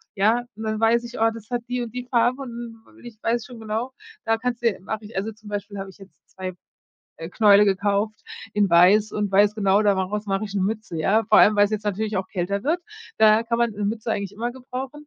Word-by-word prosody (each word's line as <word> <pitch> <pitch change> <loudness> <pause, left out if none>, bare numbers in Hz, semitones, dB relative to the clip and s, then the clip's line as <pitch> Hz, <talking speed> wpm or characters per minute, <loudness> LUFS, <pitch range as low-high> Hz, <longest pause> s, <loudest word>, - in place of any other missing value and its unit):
ja, 220 +5 +2
dann 220 0 -3
weiß 230 +1 +3
ich: 235 0 -8
Oh, 225 0 +4
das 225 -1 -11
hat 240 -1 -2
die 250 0 -1
und 230 - -7
die 250 0 -5
Farbe 245 +2 +1
und 235 -2 -8 0.2
ich 235 -3 -11
weiß 230 0 0
schon 245 -3 -11
genau: 225 +4 -4 0.3
Da 225 0 +2
kannst 245 0 -3
du 230 -5 +2
mache 215 +2 -5
ich 210 -2 -9
also, 215 +3 -2
zum 215 0 -14
Beispiel, 205 -1 -5
habe 195 0 -6
ich - - -16
jetzt 195 -2 -15 0.2
2, 185 -1 -6 0.6
äh, 165 +1 -7
Knäule 205 +1 +5
gekauft 205 +2 0 0.4
in 205 -2 +3
weiß 195 +5 +5
und 205 -1 -2
weiß 205 +2 +4
genau, 200 0 +2
da 205 -1 +3
mach 190 0 -2
raus 210 0 -3
mache 195 +2 -1
ich 205 -1 -8
'ne 195 - 0
Mütze, 215 -3 -3
ja? 215 +8 +2
Vor 215 0 +5
allem, 210 - +6
weil 205 - +5
es 205 - -9
jetzt 215 -1 -2
natürlich 210 +1 -2
auch 190 0 -2
kälter 200 +2 -3
wird, 330 +5 +1 0.4
da 220 +1 +6
kann 235 0 -1
man 235 -1 +2
'ne 205 0 -4
Mütze 220 +2 -2
eigentlich 200 -1 -3
immer 235 +3 -3
gebrauchen. 260 +3 -8
215 Hz, 245 wpm, -23 LUFS, 200-230 Hz, 0.6 s, allem